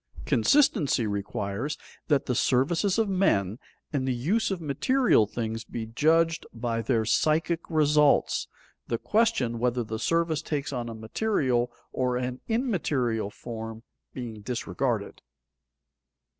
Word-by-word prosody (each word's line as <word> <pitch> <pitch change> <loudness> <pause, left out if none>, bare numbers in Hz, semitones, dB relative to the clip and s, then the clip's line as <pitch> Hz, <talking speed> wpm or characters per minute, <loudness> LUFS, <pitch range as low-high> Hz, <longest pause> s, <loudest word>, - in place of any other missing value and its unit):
Consistency 155 - +3
requires 100 +6 -3 0.3
that 145 -3 +2
the 125 - 0
services 165 - +2
of 225 -2 +2
men 120 - +1 0.3
and 135 -2 0
the 130 - +1
use 175 - +1
of 190 -3 -2
material 165 - +2
things 115 0 -4
be 115 0 -5
judged 160 +7 +2
by 115 0 -2
their 115 -2 +1
psychic 155 +8 +2
results, 150 -2 +3 0.4
the 115 - -1
question 170 - +1
whether 125 0 +1
the 110 0 -5
service 165 0 +1
takes 145 -1 -3
on 120 -2 -3
a 115 - -6
material 120 - 0 0.2
or 125 -1 0
an 125 0 -3
immaterial 150 - 0
form 115 0 -7 0.3
being 115 -4 -7
disregarded. 120 -1 -2
130 Hz, 125 wpm, -27 LUFS, 115-160 Hz, 0.4 s, Consistency